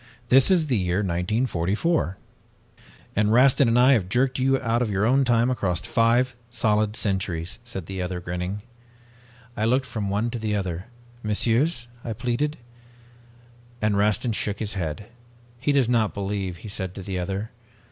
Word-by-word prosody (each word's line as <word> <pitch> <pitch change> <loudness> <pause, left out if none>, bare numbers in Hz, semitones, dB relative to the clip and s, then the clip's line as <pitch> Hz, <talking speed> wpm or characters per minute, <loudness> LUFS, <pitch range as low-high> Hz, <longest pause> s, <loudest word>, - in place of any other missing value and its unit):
This 130 +1 +6
is 180 -4 +4
the 130 -6 +1
year 90 +2 0
1944.' 95 - 0 1.0
"'And 105 +1 +2
Rastin 130 +2 +5
and 115 +1 +3
I 125 +2 +6
have 100 -7 +1
jerked 130 +4 +1
you 135 +1 +2
out 115 -1 0
of 120 - 0
your 100 +1 +1
own 135 +4 +4
time 120 0 +3
across 95 -8 0
five 120 +3 +2
solid 110 -2 +1
centuries,' 95 -3 -2
said 105 -8 -6
the 95 +1 -5
other, 90 0 -3
grinning. 90 +3 -4 0.9
"I 110 - 0
looked 130 +3 +2
from 110 -5 -3
one 105 +4 0
to 120 - -4
the 110 -1 -1
other. 90 -3 -3 0.4
'Messieurs,' 120 +5 +1 0.2
I 115 - -3
pleaded, 125 +7 -1 1.2
and 105 -2 +1
Rastin 105 +4 +2
shook 105 -1 -1
his 105 -1 -3
head. 85 +1 -4 0.5
"'He 145 +3 +1
does 140 -4 +3
not 115 -3 +1
believe,' 100 -2 -3
he 110 - -10
said 95 -2 -4
to 95 - -7
the 95 -1 -3
other. 95 +4 -3
110 Hz, 165 wpm, -24 LUFS, 95-125 Hz, 1.2 s, This